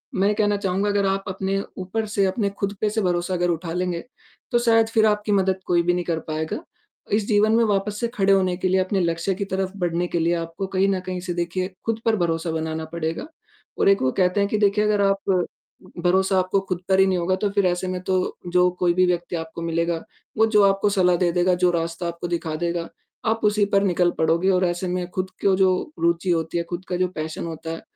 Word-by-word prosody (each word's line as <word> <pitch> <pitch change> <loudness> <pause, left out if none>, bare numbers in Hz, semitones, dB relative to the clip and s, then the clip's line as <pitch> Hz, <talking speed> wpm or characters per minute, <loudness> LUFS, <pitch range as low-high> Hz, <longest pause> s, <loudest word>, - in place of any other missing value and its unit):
मैं 200 +2 +2
कहना 205 -1 +2
चहूँगा 195 +1 0
अगर 200 -1 +1
आप 195 0 0
अपने 195 +1 -1 0.2
ऊपर 195 +4 -3
से, 200 -2 +1
अपने 200 +1 0
खुद 200 0 -1
पे 210 - +2
से 220 +1 -1
भरोसा 180 0 0 0.2
उठा 165 0 -5
लेंगे, 180 -1 -2 0.5
तो 240 - +3
शायद 225 -1 +4
फिर 220 -1 +4
आपकी 210 0 +1
मदद 190 -1 +2
कोई 175 -1 +3
भी 175 +1 +2
नहीं 180 0 -1
कर 165 -2 -1
पाएगा। 155 0 -3 0.5
इस 210 -1 +2
जीवन 215 0 +3
में 230 - +4
वापस 205 0 -1
से 235 - 0
खड़े 195 -1 +3
होने 185 -2 +2
के 185 - -1
लिए, 190 +1 +2
अपने 190 +1 0
लक्ष्य 170 +3 0
की 200 - -3
तरफ 190 -1 -2
बढ़ने 175 -1 -1
के 170 - -1
लिए 170 +1 +2
आपको 165 +3 -4
कहीं 190 +1 +1
न 190 -1 +1
कहीं 185 -1 -3
से 175 -1 -4
देखिए 175 +2 -2 0.2
खुद 225 0 -1
पर 225 -1 +3
भरोसा 165 -1 -1
बनाना 160 0 -3
पड़ेगा। 165 - -3 0.5
और - - +4
एक 195 - +4
वो 130 0 +2
कहते 185 +1 +1
हैं 200 0 +1
कि 215 - 0
देखिए 210 0 +3
अगर 210 -1 +2
आप 195 -2 +1 0.6
भरोसा 190 +1 +3
आपको 185 +2 +1
खुद 180 -1 -2
पर 190 0 +4
ही 190 - +6
भरोसा - - +1
नहीं 185 - +1
होगा, 185 +2 +1
तो 205 +1 -1
फिर 200 -2 +1
ऐसे 180 +1 -1
में 185 -1 -3
जो 180 -1 +1
कोई 175 -1 +3
भी 185 +1 +3
व्यक्ति 175 0 -1
आपको 165 0 -6
मिलेगा, 170 0 -1 0.3
वो 220 - +5
जो 210 -2 +4
आपको 195 +1 +3
सलाह 180 -3 +3
दे 175 -1 +2
देगा, 180 +1 +2
जो 180 0 +2
रास्ता 170 +1 -2
आपको 170 +1 -5
दिखा 165 -2 -2
देगा, 170 0 -2 0.4
आप 225 +1 +1
उसी 210 -1 +3
पर 195 - +4
निकल 180 -2 +2
पड़ोगे 170 +4 +2
और 185 0 +2
ऐसे 175 +1 -2
में 180 0 -2
खुद 185 0 -3 0.2
को 195 -1 +5
जो 190 -1 +4 0.3
रुचि 170 +2 +1
होती 165 0 -1
है, 170 - 0
खुद 175 +2 -6
का 180 - -1
जो 185 0 +1
पैशन 160 -2 -5
होता 160 0 -6
है, 165 - -6
185 Hz, 235 wpm, -23 LUFS, 170-200 Hz, 0.6 s, ही